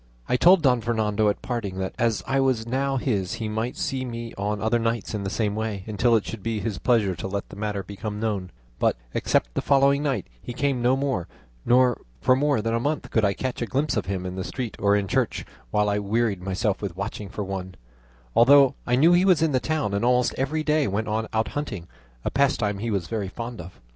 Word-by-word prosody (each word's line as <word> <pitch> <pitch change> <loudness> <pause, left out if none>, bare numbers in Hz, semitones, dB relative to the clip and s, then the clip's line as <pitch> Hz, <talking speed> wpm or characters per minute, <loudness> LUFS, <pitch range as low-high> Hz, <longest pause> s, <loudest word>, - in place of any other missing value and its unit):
I - - +2
told 175 +5 +6
Don 125 -4 +4
Fernando 110 -2 +1
at 105 - -3
parting, 115 -7 -3
that 95 0 -3
as 115 -2 +1
I 135 +1 +1
was 130 -4 +1
now 135 +3 0
his, 100 -8 -1
he 110 - -4
might 110 +3 -3
see 130 -1 -2
me 115 -2 -6
on 105 +1 -2
other 110 +3 +1
nights 115 -2 -1
in 105 - -2
the 95 - -2
same 105 0 -1
way, 110 -3 -3
until 115 +2 +2
it 110 - +1
should 110 -2 -6
be 115 +1 -2
his 105 -3 -3
pleasure 110 -7 +2
to 95 - -5
let 100 +1 -4
the - - -10
matter 105 -1 -3
become 105 +2 -6
known; 105 -5 -2 0.3
but, - - +2 0.2
except - - +1
the - - -1
following 140 0 +4
night, 135 - -1 0.2
he 120 - -6
came 130 0 0
no 125 +2 +3
more, 135 -10 -1 0.4
nor 125 0 +4 0.2
for 130 - +4
more 140 -4 +1
than 115 0 0
a 115 - +1
month 145 +5 -2
could 110 - +2
I 100 -1 +3
catch 130 -2 -3
a 120 - -1
glimpse 140 +2 0
of - - -1
him 95 -1 -3
in 90 - -4
the 95 - -3
street 125 0 -5
or 100 0 +3
in 100 -1 0
church, - - 0 0.2
while 105 +9 +2
I 105 0 +1
wearied 105 -1 0
myself 95 +2 -1
with 95 -4 -5
watching 100 0 -5
for 105 - -4
one; 95 -1 -5 0.6
although 135 +2 +7
I 125 - +3
knew 160 +7 +5
he 175 +1 +5
was 185 -5 +4
in 160 - +2
the 130 - +2
town, 155 -8 -1
and 100 +2 0
almost 125 0 +3
every 150 +4 -1
day 150 -2 +2
went 105 +3 -2
out 110 +1 -1
hunting, 110 - -5 0.4
a - - 0
pastime 120 -7 +1
he 115 +3 -2
was 100 -5 -1
very 100 -1 -3
fond 115 0 -6
of. 90 +1 -12
115 Hz, 235 wpm, -25 LUFS, 100-130 Hz, 0.6 s, although